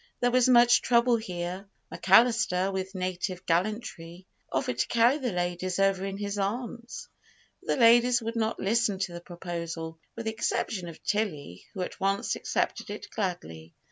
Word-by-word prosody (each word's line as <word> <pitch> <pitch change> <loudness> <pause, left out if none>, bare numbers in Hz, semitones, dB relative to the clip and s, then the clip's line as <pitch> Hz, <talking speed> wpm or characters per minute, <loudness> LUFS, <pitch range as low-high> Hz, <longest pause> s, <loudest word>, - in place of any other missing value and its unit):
There 245 0 +2
was 255 0 +4
much 240 -1 +6
trouble 240 0 +3
here. 180 -2 -5 0.3
McAllister, 195 -2 +3
with 190 +1 -4
native 185 0 -3
gallantry, 175 -1 -2 0.3
offered 125 -2 -1
to - - +1
carry 240 +5 +3
the 250 -4 -2
ladies 180 0 -2
over 195 -1 +2
in 195 0 -4
his 205 0 -3
arms; 235 - -4 0.5
but - - -1
the - - -5
ladies 240 +1 +6
would 230 0 -5
not 225 -1 -1
listen 215 -1 +1
to 190 -2 -3
the 170 - -7
proposal, 170 -2 -6 0.2
with 230 - -6
the 220 - 0
exception 200 -4 -2
of 165 - -11
Tilly, 155 - -3
who 190 - -3
at - - -7
once 195 +1 0
accepted - - -2
it - - -7
gladly. 85 - -5
195 Hz, 165 wpm, -28 LUFS, 175-230 Hz, 0.5 s, much